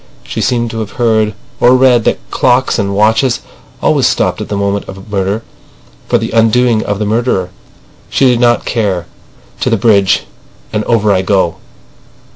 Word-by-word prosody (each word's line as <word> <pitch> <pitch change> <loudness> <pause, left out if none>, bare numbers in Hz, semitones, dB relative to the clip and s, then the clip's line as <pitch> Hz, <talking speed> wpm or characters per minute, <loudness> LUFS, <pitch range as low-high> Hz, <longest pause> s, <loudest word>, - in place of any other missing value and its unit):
She - - -5
seemed 120 -2 0
to 115 - -5
have 105 -3 -5
heard 110 -3 +1 0.2
or 125 +1 +5
read 125 -3 +4
that - - +2
clocks 125 -1 +1
and 100 -1 -1
watches 110 +4 +2 0.4
always - - +3
stopped - - 0
at - - -6
the 100 - -2
moment 100 0 -2
of 95 +2 -10
murder 100 +2 -1 0.6
for - - +2
the - - -4
undoing 115 0 +2
of 105 - -2
the 105 - -2
murderer. 105 -4 0 0.6
She 135 - +2
did 125 -2 +3
not 120 -1 +2
care. 100 -7 -1 0.5
"To - - 0
the 115 - +2
bridge—and 105 0 -1
over 110 -3 +2
I 95 - +1
go." 95 -3 0
110 Hz, 165 wpm, -13 LUFS, 100-120 Hz, 0.6 s, or